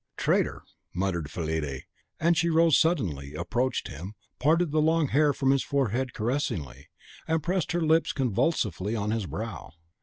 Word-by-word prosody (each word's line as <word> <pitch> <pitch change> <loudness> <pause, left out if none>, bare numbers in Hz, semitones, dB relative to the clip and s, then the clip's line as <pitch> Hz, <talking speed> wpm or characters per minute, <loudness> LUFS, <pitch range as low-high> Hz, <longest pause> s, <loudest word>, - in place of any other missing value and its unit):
"Traitor!" - - +1 0.3
muttered 85 -5 -1
Fillide; 80 -5 -3 0.4
and 170 +2 +3
she 170 +1 +2
rose 165 -2 +4
suddenly, 85 - 0
approached 120 +10 -1
him, 90 +9 -8 0.2
parted 160 +3 +2
the 155 0 +2
long 160 -2 +2
hair 150 +1 +4
from 135 -1 +1
his 135 -1 +3
forehead 130 -2 0
caressingly, 110 - -2 0.4
and 160 -1 0
pressed 180 +1 -1
her 175 - 0
lips 160 +1 +3
convulsively 115 - 0
on 105 -1 -1
his 110 -4 -1
brow. 70 - -6
130 Hz, 150 wpm, -27 LUFS, -, 0.4 s, rose